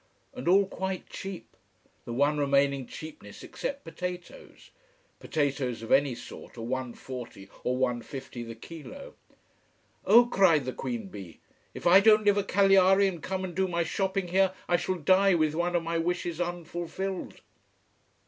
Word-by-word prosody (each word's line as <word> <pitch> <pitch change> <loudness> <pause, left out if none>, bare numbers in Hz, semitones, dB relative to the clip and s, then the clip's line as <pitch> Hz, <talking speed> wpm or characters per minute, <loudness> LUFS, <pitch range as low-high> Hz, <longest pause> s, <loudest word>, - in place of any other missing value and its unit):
And 255 - -7
all 195 +3 +5
quite 190 -1 -4
cheap, 195 -2 -8 0.5
the - - -6
one 145 +5 +1
remaining 140 -2 +2
cheapness, 150 -10 -10
except 280 0 -5
potatoes. 180 +1 -8 0.5
Potatoes 135 -6 -1
of 115 - -7
any 135 -2 +4
sort - - -11
are - - -6
1.40 125 -3 -6 0.2
or 125 0 0
1.50 125 -1 -3
the 115 - -7
kilo. 165 - -10 0.9
"Oh!" 235 +4 +7
cried 190 - +3
the 130 - -3
q 240 - -3
b, 100 - -10 0.4
"If - - -8
I 175 +2 +8
don't 215 +1 +5
live 205 0 +4
at 200 - -3
Cagliari 195 0 +5
and 175 -4 -4
come 190 0 -3
and 185 -2 -5
do 190 +1 +1
my 170 -1 0
shopping 190 +2 -2
here, 190 +1 +3
I 175 - +3
shall 185 +2 -1
die 185 +3 +4
with 155 -2 +1
one 175 +2 -1
of 170 - +1
my 165 0 -1
wishes 175 0 -2
unfulfilled." 175 +2 -4
175 Hz, 155 wpm, -28 LUFS, 140-190 Hz, 0.9 s, I